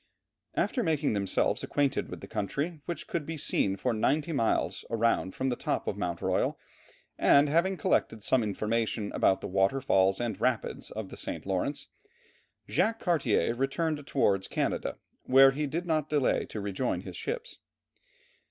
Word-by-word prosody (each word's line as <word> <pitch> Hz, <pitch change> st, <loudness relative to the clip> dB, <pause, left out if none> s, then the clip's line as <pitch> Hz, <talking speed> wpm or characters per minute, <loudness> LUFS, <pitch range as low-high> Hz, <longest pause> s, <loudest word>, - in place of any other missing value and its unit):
After 250 Hz, -, +1 dB
making 155 Hz, -, +1 dB
themselves 100 Hz, -2 st, +1 dB
acquainted 140 Hz, -2 st, 0 dB
with -, -, -8 dB
the -, -, -8 dB
country, 145 Hz, -, -3 dB
which 175 Hz, -, -5 dB
could 170 Hz, -, -3 dB
be 160 Hz, +2 st, -5 dB
seen 100 Hz, -9 st, +1 dB
for 120 Hz, +5 st, -1 dB
ninety 145 Hz, +9 st, +1 dB
miles 115 Hz, -7 st, 0 dB
around 115 Hz, -4 st, +1 dB
from 130 Hz, 0 st, -1 dB
the 125 Hz, -, 0 dB
top -, -, -2 dB
of -, -, -2 dB
Mount 85 Hz, -1 st, -3 dB
Royal, -, -, +1 dB, 0.6 s
and 140 Hz, +1 st, +6 dB
having 170 Hz, +6 st, +2 dB
collected 115 Hz, -, 0 dB
some 130 Hz, +3 st, +3 dB
information 110 Hz, 0 st, -1 dB
about 95 Hz, -, +2 dB
the -, -, -4 dB
water 95 Hz, +7 st, +2 dB
falls 95 Hz, -7 st, +2 dB
and 120 Hz, -4 st, -3 dB
rapids 125 Hz, -3 st, -1 dB
of 110 Hz, -3 st, -6 dB
the -, -, -10 dB
St. -, -, -4 dB
Lawrence, 95 Hz, +9 st, -2 dB, 0.8 s
Jacques 225 Hz, 0 st, +1 dB
Cartier 135 Hz, -, +2 dB
returned 145 Hz, +3 st, -1 dB
towards 95 Hz, -8 st, +1 dB
Canada, -, -, -2 dB, 0.3 s
where 135 Hz, +1 st, +7 dB
he 150 Hz, +2 st, -2 dB
did 170 Hz, +5 st, -3 dB
not 155 Hz, -3 st, 0 dB
delay 145 Hz, -4 st, +1 dB
to 110 Hz, -, -6 dB
rejoin 100 Hz, +5 st, -2 dB
his -, -, -8 dB
ships. 485 Hz, +1 st, -5 dB
130 Hz, 160 wpm, -29 LUFS, 105-155 Hz, 0.8 s, where